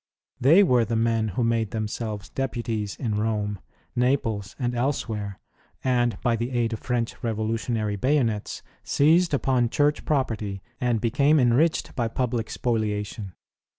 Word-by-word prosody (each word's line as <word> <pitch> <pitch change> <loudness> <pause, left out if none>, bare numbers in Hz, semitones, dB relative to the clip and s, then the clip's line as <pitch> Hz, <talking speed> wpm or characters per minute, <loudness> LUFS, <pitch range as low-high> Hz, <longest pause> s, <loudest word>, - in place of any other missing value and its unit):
They 160 +10 +6
were 125 -9 +4
the 115 +1 -2
men 115 -1 +1
who 110 +4 -1
made 115 -2 +1
themselves 110 -1 -4
deputies 115 -6 -3
in 110 -5 -2
Rome, 105 -2 -1 0.4
Naples, 115 -6 0
and 125 -2 -1
elsewhere, 110 -6 -2 0.4
and 120 -4 +1
by 120 -1 +3
the 115 +2 -2
aid 120 -2 0
of 110 - -4
French 120 -2 -2
revolutionary 110 -1 -1
bayonets 120 -3 0 0.2
seized 165 +5 +3
upon 130 -4 +2
Church 145 +4 +1
property 110 -9 -1 0.2
and 120 -3 +1
became 140 +7 +3
enriched 130 +6 +2
by 120 -3 0
public 115 -1 -2
spoliation. 105 -4 -2
115 Hz, 135 wpm, -25 LUFS, 110-125 Hz, 0.4 s, They